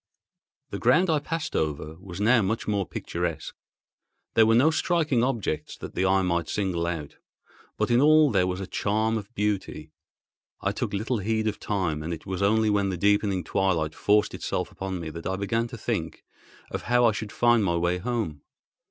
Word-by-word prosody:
The -, -, -4 dB
ground 180 Hz, +1 st, +4 dB
I 155 Hz, -, +2 dB
passed 160 Hz, +2 st, -4 dB
over 75 Hz, 0 st, -2 dB
was 95 Hz, -1 st, -9 dB
now 115 Hz, +3 st, +4 dB
much 110 Hz, +3 st, -2 dB
more 100 Hz, -3 st, 0 dB
picturesque. 85 Hz, -1 st, -4 dB, 0.8 s
There 110 Hz, -1 st, +5 dB
were 115 Hz, -, +4 dB
no 140 Hz, +7 st, +5 dB
striking 155 Hz, -7 st, +1 dB
objects 115 Hz, -, -2 dB
that -, -, -8 dB
the 95 Hz, +1 st, +1 dB
eye 95 Hz, 0 st, +3 dB
might 85 Hz, -2 st, 0 dB
single 90 Hz, -4 st, -1 dB
out; 80 Hz, -4 st, -5 dB, 0.6 s
but -, -, 0 dB
in 120 Hz, +2 st, +5 dB
all 155 Hz, -1 st, +6 dB
there 90 Hz, -4 st, +2 dB
was 90 Hz, 0 st, -2 dB
a 95 Hz, -, -4 dB
charm 110 Hz, +4 st, 0 dB
of 105 Hz, 0 st, -5 dB
beauty. 100 Hz, -7 st, -2 dB, 0.7 s
I -, -, 0 dB
took -, -, -3 dB
little 110 Hz, +4 st, -1 dB
heed 110 Hz, +2 st, -1 dB
of 105 Hz, -, -2 dB
time 90 Hz, -7 st, -1 dB
and 85 Hz, +2 st, -3 dB
it 80 Hz, -, -15 dB
was 95 Hz, 0 st, -4 dB
only 110 Hz, +2 st, +3 dB
when 100 Hz, -1 st, +1 dB
the 90 Hz, -, -3 dB
deepening 100 Hz, -1 st, +2 dB
twilight 80 Hz, -3 st, 0 dB
forced 105 Hz, +1 st, +2 dB
itself -, -, -3 dB
upon 95 Hz, -1 st, -5 dB
me 80 Hz, -2 st, -5 dB
that 85 Hz, +1 st, -6 dB
I 95 Hz, -, -1 dB
began 115 Hz, +4 st, -1 dB
to -, -, -9 dB
think -, -, -3 dB, 0.5 s
of -, -, -3 dB
how 120 Hz, 0 st, +4 dB
I 115 Hz, -, +5 dB
should 105 Hz, -1 st, -5 dB
find 120 Hz, -1 st, +3 dB
my 85 Hz, -3 st, +1 dB
way 85 Hz, +1 st, 0 dB
home. 105 Hz, -9 st, -3 dB
100 Hz, 195 wpm, -26 LUFS, 90-115 Hz, 0.8 s, all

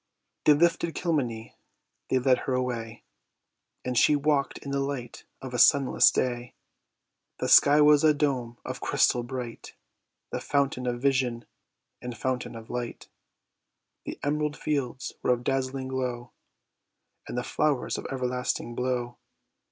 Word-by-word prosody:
They 150 Hz, -, +8 dB
lifted 170 Hz, +1 st, +1 dB
Kilmeny, 125 Hz, -10 st, -2 dB, 0.6 s
they -, -, +2 dB
led 130 Hz, 0 st, +3 dB
her 130 Hz, -, -2 dB
away, 115 Hz, -3 st, -3 dB, 0.8 s
And 125 Hz, 0 st, -2 dB
she 150 Hz, +5 st, +5 dB
walk'd 145 Hz, -1 st, +1 dB
in 140 Hz, -, -6 dB
the 140 Hz, -, 0 dB
light 135 Hz, -3 st, -5 dB, 0.2 s
of 130 Hz, -1 st, -7 dB
a 125 Hz, -, -1 dB
sunless 135 Hz, +2 st, +6 dB
day; 120 Hz, -1 st, -2 dB, 0.8 s
The -, -, -2 dB
sky 145 Hz, +1 st, +7 dB
was 150 Hz, 0 st, +6 dB
a 155 Hz, -, +6 dB
dome 130 Hz, -5 st, -1 dB
of -, -, -6 dB
crystal 120 Hz, -, +2 dB
bright, 120 Hz, -1 st, -7 dB, 0.6 s
The -, -, -3 dB
fountain 140 Hz, -3 st, 0 dB
of 120 Hz, 0 st, -1 dB
vision, 130 Hz, -4 st, +1 dB, 0.6 s
and 125 Hz, -1 st, -6 dB
fountain 130 Hz, -2 st, -3 dB
of 115 Hz, 0 st, -10 dB
light: 120 Hz, -1 st, -5 dB, 1.0 s
The -, -, -6 dB
emerald 150 Hz, +1 st, -1 dB
fields 135 Hz, -4 st, -3 dB
were 125 Hz, -, +3 dB
of 120 Hz, 0 st, -4 dB
dazzling 130 Hz, 0 st, -2 dB
glow, 125 Hz, -2 st, -3 dB, 1.0 s
And -, -, -5 dB
the 125 Hz, -, -1 dB
flowers 145 Hz, 0 st, 0 dB
of -, -, -6 dB
everlasting 125 Hz, -2 st, -2 dB
blow. 125 Hz, -1 st, -2 dB
130 Hz, 140 wpm, -27 LUFS, 120-140 Hz, 1.0 s, They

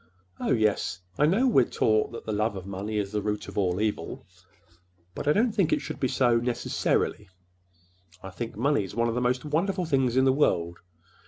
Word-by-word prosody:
Oh, -, -, -2 dB
yes, 105 Hz, -6 st, +1 dB, 0.2 s
I 150 Hz, -, +5 dB
know—we're 205 Hz, -, +4 dB
taught 110 Hz, -1 st, +1 dB
that 115 Hz, -, -8 dB
the 110 Hz, -, -3 dB
love 105 Hz, +1 st, 0 dB
of 95 Hz, -1 st, -7 dB
money 100 Hz, +2 st, -4 dB
is 100 Hz, -1 st, -2 dB
the 105 Hz, -1 st, -1 dB
root 105 Hz, 0 st, -3 dB
of -, -, -9 dB
all 90 Hz, -2 st, 0 dB
evil. 105 Hz, -1 st, -3 dB, 0.9 s
But -, -, -6 dB
I -, -, +5 dB
don't 225 Hz, +8 st, +2 dB
think 195 Hz, -7 st, +1 dB
it -, -, +3 dB
should -, -, -7 dB
be 130 Hz, -, +1 dB
so—necessarily. 120 Hz, -4 st, 0 dB, 0.9 s
I 95 Hz, -, -7 dB
think 115 Hz, +4 st, -6 dB
money's 115 Hz, -5 st, 0 dB
one 115 Hz, 0 st, +1 dB
of -, -, -1 dB
the 125 Hz, -, -1 dB
most 125 Hz, +3 st, 0 dB
wonderful 180 Hz, +5 st, 0 dB
things 135 Hz, -5 st, +1 dB
in 130 Hz, -, +4 dB
the 130 Hz, -, +4 dB
world. 85 Hz, -, +1 dB
115 Hz, 190 wpm, -27 LUFS, 105-140 Hz, 0.9 s, I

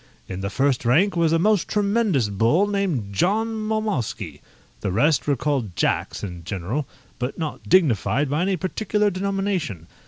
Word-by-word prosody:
In 95 Hz, 0 st, -5 dB
the 100 Hz, -, -2 dB
first 135 Hz, +2 st, +1 dB
rank 165 Hz, -, +3 dB
was 165 Hz, -2 st, +2 dB
a 165 Hz, -, +4 dB
most 205 Hz, +2 st, +2 dB
tremendous 205 Hz, -, +1 dB
bull 115 Hz, -, +3 dB
named 185 Hz, -, -1 dB
John 210 Hz, -, +1 dB
Mowmowsky; 215 Hz, -, -2 dB, 0.4 s
the 100 Hz, -, -2 dB
rest 145 Hz, -, +2 dB
were 145 Hz, -, +3 dB
called 130 Hz, -9 st, -2 dB
Jacks -, -, -1 dB
in 90 Hz, -4 st, -6 dB
general, 100 Hz, -, -3 dB, 0.3 s
but 125 Hz, +2 st, -3 dB
not 155 Hz, -3 st, -5 dB
dignified 145 Hz, -, +3 dB
by 145 Hz, +4 st, 0 dB
any 190 Hz, +1 st, +1 dB
particular 210 Hz, +4 st, 0 dB
denomination. 190 Hz, -, -2 dB
155 Hz, 155 wpm, -23 LUFS, -, 0.4 s, a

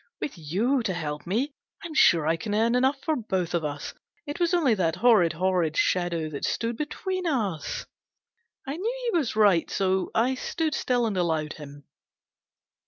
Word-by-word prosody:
With 290 Hz, -, -4 dB
you 200 Hz, -, 0 dB
to 190 Hz, -5 st, -2 dB
help 150 Hz, -2 st, -4 dB
me, 250 Hz, +10 st, -1 dB, 0.3 s
I'm 335 Hz, -1 st, -6 dB
sure 170 Hz, -, +5 dB
I 160 Hz, +1 st, +2 dB
can 205 Hz, +6 st, -3 dB
earn 225 Hz, +2 st, +2 dB
enough 265 Hz, +3 st, +2 dB
for 315 Hz, -, +1 dB
both 190 Hz, -, -2 dB
of 170 Hz, -2 st, 0 dB
us. 145 Hz, -1 st, -4 dB, 0.3 s
It 290 Hz, +3 st, -5 dB
was 345 Hz, -1 st, +2 dB
only 325 Hz, -9 st, +3 dB
that 170 Hz, -5 st, 0 dB
horrid, 205 Hz, -8 st, +4 dB
horrid 175 Hz, -2 st, 0 dB
shadow 175 Hz, -3 st, +1 dB
that 140 Hz, -, -6 dB
stood 230 Hz, 0 st, -1 dB
between 365 Hz, -, -3 dB
us! 205 Hz, -, -2 dB, 0.4 s
" 465 Hz, -9 st, -40 dB
I 280 Hz, +3 st, -3 dB
knew 480 Hz, +5 st, -2 dB
he -, -, -2 dB
was 265 Hz, -9 st, -2 dB
right, 200 Hz, -6 st, +4 dB
so 190 Hz, -1 st, 0 dB
I 245 Hz, +4 st, +3 dB
stood 310 Hz, +4 st, -2 dB
still 245 Hz, -5 st, +1 dB
and 210 Hz, -4 st, -1 dB
allowed 160 Hz, -3 st, 0 dB
him. 145 Hz, -1 st, -11 dB
210 Hz, 180 wpm, -26 LUFS, 170-275 Hz, 0.4 s, sure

